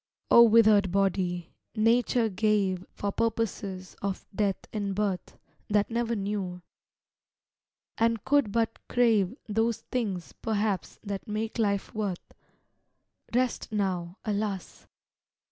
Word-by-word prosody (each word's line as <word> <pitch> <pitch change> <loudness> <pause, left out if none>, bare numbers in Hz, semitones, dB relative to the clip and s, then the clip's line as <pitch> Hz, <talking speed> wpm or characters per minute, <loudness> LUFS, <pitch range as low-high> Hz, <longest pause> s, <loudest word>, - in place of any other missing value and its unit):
O 235 - +9
withered 215 -4 +6
body, 185 -3 0 0.2
Nature 230 +1 +3
gave 195 -2 +1
For 200 - -2
purposes 200 -5 -2
of 195 -1 -3
death 195 -1 +1 0.2
and 200 -3 -2
birth, 200 -3 -2 0.3
That 210 +1 +2
never 235 0 0
knew, 195 -3 -3 1.4
and 230 -2 +1
could 280 -6 +3
but 225 +1 0
crave 225 -4 +3
Those 225 +1 0
things 200 -8 -2
perhaps 210 -4 -1
that 200 -2 -5
make 220 +2 -3
life 200 -3 0
worth 205 -5 -4 1.0
Rest 250 -1 0
now, 185 -3 -1
alas! 205 -3 -3
210 Hz, 110 wpm, -28 LUFS, 195-225 Hz, 1.4 s, O